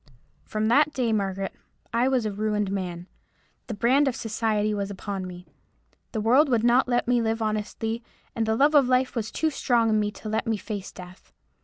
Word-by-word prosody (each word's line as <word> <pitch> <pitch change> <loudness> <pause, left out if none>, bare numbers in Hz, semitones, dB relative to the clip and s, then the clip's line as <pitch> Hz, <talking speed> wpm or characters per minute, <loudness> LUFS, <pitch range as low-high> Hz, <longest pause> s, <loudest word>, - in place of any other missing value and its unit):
"From 215 0 -1
that 295 +5 +4
day, 240 -4 0
Margaret, 195 -2 -2 0.4
I 235 +2 +2
was 260 -4 +1
a 215 - -1
ruined 210 -1 -1
man. 180 -3 -4 0.6
The 225 - -4
brand 260 +7 +3
of 260 - 0
society 215 -1 -1
was 200 -1 -2
upon 195 -1 -5
me. 180 0 -10 0.7
The 220 - -2
world 255 +8 +4
would 235 -3 +2
not 245 +2 +4
let 245 -1 +1
me 245 -1 +3
live 225 0 0
honestly, 220 +1 -2 0.3
and 225 -1 -1
the 220 - +2
love 290 +4 +4
of 285 -4 +5
life 255 +1 +1
was 220 -2 -2
too 315 -1 0
strong 235 -5 +2
in 215 - +3
me 210 0 0
to 220 - -9
let 220 +2 -1
me 225 -1 +1
face 205 -2 -6
death. 180 +1 -13
220 Hz, 200 wpm, -25 LUFS, 205-245 Hz, 0.7 s, of